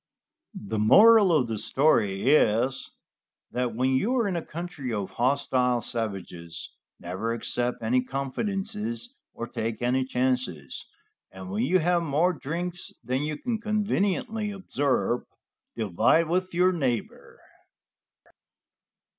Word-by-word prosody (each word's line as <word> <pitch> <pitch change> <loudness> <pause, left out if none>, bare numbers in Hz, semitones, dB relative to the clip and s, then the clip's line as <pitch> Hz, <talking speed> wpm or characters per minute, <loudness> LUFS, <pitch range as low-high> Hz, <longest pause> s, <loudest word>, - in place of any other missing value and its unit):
The 105 +1 -4
moral 205 - +7
of 150 -7 +3
this 110 -2 -3
story 115 -6 +2
is, 125 -2 +2 0.6
that 125 -2 -2
when 130 +2 +1
you 205 - +1
are 235 -4 +2
in 195 - -1
the 170 - -1
country 160 -6 -6
of 100 -3 -3
hostile 125 -1 +1
savages, 95 -7 -5 0.3
never 95 +6 -3
accept 120 +1 -2
any 125 +3 +2
confidences 210 - -3 0.2
or 115 - -4
take 115 -1 -4
any 130 +2 +2
chances, 125 - -2 0.4
and 95 0 -9
when 105 +3 -1
you 160 +10 +3
have 175 0 +2
more 165 +3 +2
drinks 175 +4 -4
than 130 +2 -1
you 150 0 -3
can 225 +4 -3
conveniently 210 0 0
absorb, 145 -10 -1 0.5
divide 110 - +2
with 185 +2 0
your 180 +1 +4
neighbor. 130 - -3
130 Hz, 120 wpm, -26 LUFS, 115-180 Hz, 0.6 s, moral